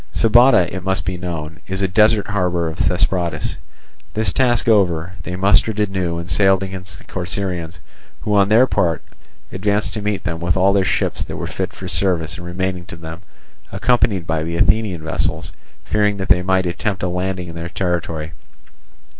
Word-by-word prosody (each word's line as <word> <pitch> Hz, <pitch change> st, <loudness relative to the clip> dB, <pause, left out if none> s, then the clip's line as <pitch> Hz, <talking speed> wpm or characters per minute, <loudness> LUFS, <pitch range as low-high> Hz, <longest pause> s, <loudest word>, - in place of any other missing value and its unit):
Sybota, 115 Hz, -4 st, +5 dB
it 95 Hz, -, -4 dB
must 95 Hz, -3 st, 0 dB
be 90 Hz, +2 st, -2 dB
known, 80 Hz, -3 st, -5 dB
is 95 Hz, +1 st, -2 dB
a -, -, +3 dB
desert 105 Hz, +2 st, +3 dB
harbour 90 Hz, -4 st, 0 dB
of 80 Hz, -, -6 dB
Thesprotis. 85 Hz, -1 st, 0 dB, 0.6 s
This 110 Hz, -4 st, 0 dB
task 120 Hz, -4 st, +2 dB
over, 90 Hz, -5 st, +2 dB
they 90 Hz, +1 st, -5 dB
mustered 100 Hz, +3 st, +3 dB
anew, 95 Hz, -5 st, -1 dB
and 85 Hz, 0 st, -5 dB
sailed 95 Hz, +2 st, +3 dB
against 95 Hz, -3 st, -7 dB
the -, -, -16 dB
Corcyraeans, 90 Hz, -2 st, -4 dB, 0.4 s
who 105 Hz, -, -1 dB
on 100 Hz, -1 st, +4 dB
their 115 Hz, +4 st, +6 dB
part 85 Hz, -9 st, 0 dB, 0.5 s
advanced 105 Hz, +2 st, 0 dB
to 105 Hz, -, -4 dB
meet 105 Hz, -1 st, -2 dB
them 80 Hz, -1 st, -3 dB
with 85 Hz, +1 st, 0 dB
all 95 Hz, +1 st, +4 dB
their 100 Hz, -1 st, +3 dB
ships -, -, 0 dB
that -, -, -6 dB
were -, -, -4 dB
fit -, -, -3 dB
for -, -, -8 dB
service 85 Hz, -4 st, 0 dB
and 85 Hz, -1 st, -8 dB
remaining 90 Hz, 0 st, -3 dB
to -, -, -9 dB
them, 80 Hz, 0 st, -9 dB, 0.5 s
accompanied 100 Hz, -3 st, +1 dB
by 80 Hz, -1 st, -1 dB
the 85 Hz, +1 st, -3 dB
Athenian 95 Hz, -5 st, +1 dB
vessels, 80 Hz, -, -2 dB, 0.3 s
fearing 105 Hz, -1 st, +1 dB
that 95 Hz, 0 st, -4 dB
they 90 Hz, -, +5 dB
might 95 Hz, 0 st, +1 dB
attempt 95 Hz, +2 st, -2 dB
a -, -, +1 dB
landing 90 Hz, 0 st, -2 dB
in 85 Hz, -, -9 dB
their 85 Hz, +1 st, -5 dB
territory. 85 Hz, -4 st, -2 dB
95 Hz, 180 wpm, -19 LUFS, 85-100 Hz, 0.6 s, their